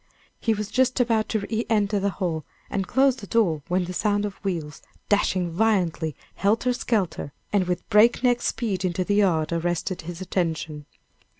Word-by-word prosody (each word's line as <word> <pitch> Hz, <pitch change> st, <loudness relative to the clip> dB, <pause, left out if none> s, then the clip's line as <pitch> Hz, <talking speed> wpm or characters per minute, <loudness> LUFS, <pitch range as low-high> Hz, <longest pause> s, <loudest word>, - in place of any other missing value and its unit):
He 225 Hz, -1 st, +1 dB
was 210 Hz, 0 st, -4 dB
just 255 Hz, 0 st, +2 dB
about 230 Hz, -3 st, +2 dB
to 220 Hz, -, 0 dB
re 220 Hz, +3 st, -2 dB
enter 210 Hz, -2 st, +2 dB
the 200 Hz, +1 st, +1 dB
hall 175 Hz, -5 st, -2 dB, 0.3 s
and 195 Hz, -2 st, -1 dB
close 265 Hz, 0 st, +3 dB
the 200 Hz, -, -9 dB
door 180 Hz, -10 st, +2 dB
when 180 Hz, 0 st, +1 dB
the 180 Hz, -, -5 dB
sound 205 Hz, +2 st, +1 dB
of 205 Hz, 0 st, -7 dB
wheels, 165 Hz, -6 st, -3 dB, 0.3 s
dashing 185 Hz, -4 st, +2 dB
violently, 175 Hz, -5 st, +1 dB, 0.2 s
helter 225 Hz, +5 st, +1 dB
skelter, 200 Hz, -, -1 dB, 0.2 s
and 190 Hz, -3 st, +2 dB
with 180 Hz, -1 st, -2 dB
break 225 Hz, +4 st, +5 dB
neck 245 Hz, -1 st, +3 dB
speed 200 Hz, -6 st, -1 dB
into 185 Hz, 0 st, 0 dB
the 205 Hz, -, 0 dB
yard, 175 Hz, -6 st, +2 dB
arrested 175 Hz, +2 st, -1 dB
his 170 Hz, +1 st, -7 dB
attention. 160 Hz, -5 st, -2 dB
195 Hz, 175 wpm, -25 LUFS, 175-220 Hz, 0.3 s, break